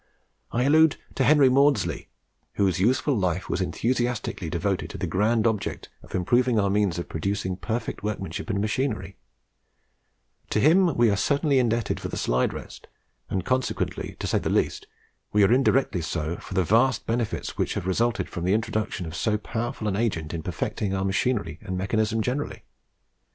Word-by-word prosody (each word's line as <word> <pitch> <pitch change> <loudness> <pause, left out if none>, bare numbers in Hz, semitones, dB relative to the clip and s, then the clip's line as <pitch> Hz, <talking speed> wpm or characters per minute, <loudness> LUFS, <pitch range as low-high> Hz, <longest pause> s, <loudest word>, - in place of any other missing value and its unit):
I 120 - +1
allude 155 +2 +5 0.2
to 135 - 0
Henry 145 +1 +6
Maudslay, 140 +2 +2 0.5
whose 95 -3 +1
useful 130 +7 +2
life 90 -3 -1
was 95 - -1
enthusiastically 120 +7 -1
devoted - - -1
to - - -7
the - - -2
grand 110 +4 +1
object 110 -3 -1
of - - -9
improving 120 +6 +2
our 100 -1 +2
means 100 -4 +1
of 85 - -4
producing 95 +2 -2
perfect 115 +4 -4
workmanship 105 +1 -4
and 100 -2 0
machinery: 110 +3 -2 1.3
to - - +1
him 170 - +4
we 120 -2 +5
are - - +2
certainly 140 +5 +2
indebted 115 -2 0
for - - -4
the - - -5
slide 60 +1 +1
rest, - - -9 0.4
and, 95 -2 -2
consequently, 130 0 -1
to - - -5
say - - +1
the - - -2
least, - - 0 0.5
we 105 0 +5
are 100 - +5
indirectly 130 -7 +2
so 80 0 -2
for - - -9
the 95 - +3
vast 115 +6 +2
benefits 115 -1 -2
which - - -1
have - - -3
resulted 100 +1 0
from 85 - -6
the 90 +2 +2
introduction 110 -4 -2
of 80 0 -7
so 105 +2 +1
powerful 115 0 -4
an 100 - 0
agent 95 -8 -1
in 85 - -3
perfecting 95 +5 -2
our 95 0 -1
machinery 95 -4 0
and 95 0 -4
mechanism 110 +3 0
generally. 130 +5 -3
110 Hz, 170 wpm, -25 LUFS, 95-125 Hz, 1.3 s, Henry